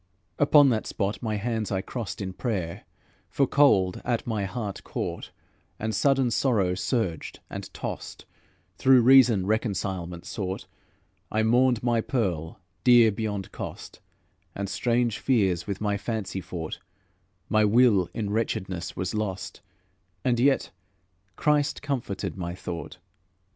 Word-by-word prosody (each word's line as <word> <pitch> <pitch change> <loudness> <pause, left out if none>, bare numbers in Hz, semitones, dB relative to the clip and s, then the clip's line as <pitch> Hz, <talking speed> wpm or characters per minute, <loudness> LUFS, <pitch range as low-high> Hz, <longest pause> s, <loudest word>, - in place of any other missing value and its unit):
Upon 145 -1 +6
that 110 -3 0
spot 100 +1 -2
my 110 -2 -1
hands 110 0 -2
I 95 -1 0
crossed 110 0 -5
In 95 -1 -4
prayer, 95 -7 -3 0.4
for 135 +9 +2
cold 105 -11 +3
at 120 -2 -1
my 110 -4 -1
heart 105 -1 -5
caught, - - -4 0.5
And 110 0 -3
sudden 135 +2 +2
sorrow 105 -9 +2
surged 90 - -2
and - - -6
tossed, - - -6 0.5
Though - - 0
reason 125 -5 +6
reconcilement 95 -5 -2
sought. 95 -1 -4 0.7
I 110 0 +1
mourned 120 +1 +3
my 120 -2 +2
pearl, 95 - -2 0.2
dear 120 -2 +7
beyond 105 -2 -4
cost, - - -8 0.6
And 100 0 -3
strange 120 +2 0
fears 95 -9 +1
with 100 -2 -3
my 105 -1 0
fancy 105 -3 -3
fought; 80 -3 -6 0.7
My 110 -1 +3
will 105 -5 +4
in 105 0 -3
wretchedness 95 -5 -2
was 95 0 -3
lost, 95 -4 -4 0.6
And 120 -2 +2
yet 135 +2 +2 0.6
Christ 150 -1 +1
comforted 125 -9 -3
my 85 -2 -4
thought. 85 -2 -6
110 Hz, 130 wpm, -26 LUFS, 95-120 Hz, 0.7 s, dear